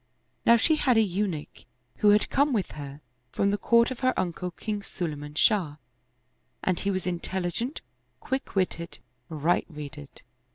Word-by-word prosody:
Now 235 - +8
she 310 +7 +3
had 255 -6 +3
a - - +7
Eunuch 185 -5 -3 0.3
who 210 - +4
had 210 0 +4
come 285 0 +3
with 205 -6 0
her 145 0 -8 0.3
from 200 - +1
the 205 - +1
court 235 +4 +4
of 260 - -5
her 255 -1 +1
uncle 180 0 -2
King 205 +4 -4
Sulayman 150 -6 -5
Shah, 180 -9 +3 0.9
and 185 -2 +1
he 200 - -1
was 185 -2 -1
intelligent, 185 - -2 0.4
quick 265 -3 -4
witted, 175 -3 -1 0.3
right 160 +2 +1
reded. 145 -2 -9
185 Hz, 155 wpm, -27 LUFS, 165-220 Hz, 0.9 s, Now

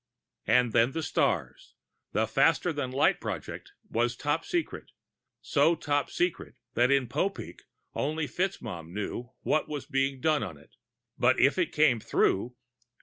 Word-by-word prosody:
And 120 +1 +3
then, 120 +3 +3
the 160 - -2
stars. - - -1 0.4
The - - +1
faster 175 - +2
than 145 -4 -3
light 135 +3 +2
project - - -6
was 120 +1 0
top 145 +5 -1
secret, 345 -2 -3 0.5
so 155 +3 +3
top 145 -3 -1
secret 175 -1 -2 0.2
that 120 +1 +3
in 140 -2 +3
Popeek 195 +11 -3 0.3
only 155 +2 -1
FitzMaugham 110 - -4
knew 110 +4 -4
what 155 - +1
was 145 -3 -4
being 135 -2 0
done 155 +2 +2
on 80 - -5
it. 70 - -21 0.5
But - - +4
if - - +4
it - - +1
came 145 -6 +3
through.... 115 +3 +1
140 Hz, 145 wpm, -28 LUFS, 120-155 Hz, 0.5 s, But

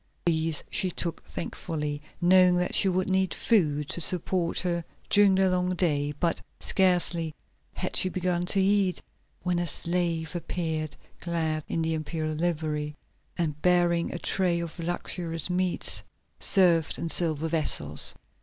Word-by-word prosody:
These 160 -2 +1
she 190 -3 +2
took 170 -1 -3
thankfully, 150 -4 -4 0.2
knowing 180 0 +5
that 180 0 0
she 195 - +4
would 185 0 0
need 190 0 +1
food 150 -10 +1
to 170 - -1
support 175 0 +1
her 170 -2 -1 0.3
during 200 -2 +6
the 190 0 +3
long 180 0 0
day, 145 -5 +1
but 170 -2 0 0.2
scarcely 175 -4 +2 0.4
had - - -3
she 185 - +3
begun 180 -1 -1
to 195 - +2
eat 195 -1 +2 0.4
when 180 -1 0
a 175 - -1
slave 170 0 -1
appeared 160 -3 -3 0.2
clad 160 -3 -2
in 165 - -1
the 160 0 0
imperial 155 0 -3
livery, 155 -2 -2 0.4
and 155 -4 -2
bearing 175 -1 +2
a - - -4
tray 175 -1 0
of 170 0 -6
luxurious 170 0 -3
meats 180 0 0 0.4
served 175 -5 +4
in 165 - -3
silver 160 -2 +2
vessels. 145 - +1
170 Hz, 145 wpm, -27 LUFS, 160-180 Hz, 0.4 s, during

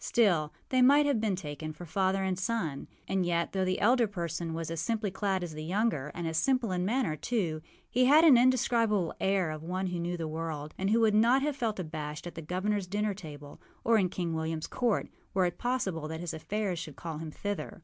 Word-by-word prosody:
Still 175 -10 +2 0.2
they 255 -1 +3
might 285 +4 +6
have 275 -7 +1
been 210 -4 +1
taken 155 -2 -6
for 175 +3 -9
father 190 +3 +1
and 190 -1 0
son. 185 -7 -2 0.2
And 190 -1 +1
yet, 170 -1 0
though 190 -1 0
the 185 0 0
elder 240 +2 +4
person 170 -4 -4
was 165 0 -4
as 165 - -2
simply 220 -4 -1
clad 190 -1 -1
as 170 -3 -5
the 155 0 -6
younger, 175 - 0
and 175 -1 -3
as 160 0 -2
simple 255 -2 +1
in 180 -1 0
manner 225 -5 0
too, 170 -5 -1 0.3
he 255 +1 +2
had 300 +5 +7
an 310 -6 +8
indescribable 235 -6 +3
air 190 -4 +1
of 155 -1 -6
one 185 +4 -3
who 180 -1 -2
knew 175 +1 -2
the 165 -2 -3
world, 155 -1 -4
and 195 +1 -1
who 230 +2 +3
would 220 -2 +4
not 235 +5 +4
have 295 -1 0
felt 225 -6 -2
abashed 155 -3 -5
at 175 - -6
the 165 - -7
governorâs 185 +4 -1
dinner 210 +1 0
table 150 -6 -10 0.2
or 230 -1 +4
in 185 -2 +2
King 175 -2 -3
Williamâs 160 0 -2
court, 240 -4 +1 0.3
were 190 -1 +4
it 175 0 -3
possible 195 -11 -1
that 160 +1 -5
his 175 -1 -4
affairs 195 +2 -2
should 155 -4 -7
call 160 -3 -6
him 160 -1 -5
thither. 205 +4 -5
185 Hz, 225 wpm, -30 LUFS, 165-220 Hz, 0.3 s, an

